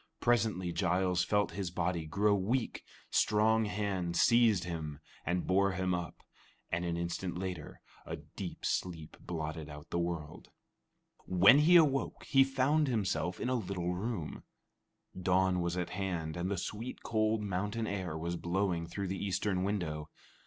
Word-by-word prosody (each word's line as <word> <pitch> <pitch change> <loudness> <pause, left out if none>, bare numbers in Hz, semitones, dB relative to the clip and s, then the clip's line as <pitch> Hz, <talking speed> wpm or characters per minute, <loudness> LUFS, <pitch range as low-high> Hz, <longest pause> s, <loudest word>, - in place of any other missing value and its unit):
Presently 110 -7 +1
Giles 90 +1 +1
felt 105 +2 +1
his 100 -3 -3
body 85 -2 -1
grow 100 +6 +2
weak, 110 +6 -1 0.3
strong 110 +1 +3
hands 95 -5 -1
seized 115 -6 +5
him 80 -4 -4 0.3
and 90 0 0
bore 100 +1 +3
him 95 0 0
up, 85 -2 -4 0.5
and 85 +1 0
an 85 -1 -1
instant 85 +1 -3
later 90 -4 -5 0.2
a - - -5
deep - - -8
sleep 80 -4 -2
blotted 80 -2 -5
out 75 +1 -10
the 85 - 0
world. 85 -3 -4 0.8
When 95 +9 +7
he 165 +4 +6
awoke, 145 -5 +3
he 135 0 +5
found 135 +3 +2
himself 95 - -1
in - - -2
a - - +1
little 90 -6 -2
room. 95 -3 -4 0.7
Dawn 95 0 +2
was 85 +1 -1
at 90 - -2
hand, 90 -5 -3
and 90 +2 -2
the 100 - -1
sweet, 110 +7 -5
cold 110 -1 +1
mountain 105 +3 -2
air 95 -6 -3
was 85 +2 -3
blowing 85 -1 -1
through 100 +4 -4
the 95 +1 -3
eastern 95 -1 0
window. 85 -7 -2
95 Hz, 150 wpm, -32 LUFS, 85-105 Hz, 0.8 s, When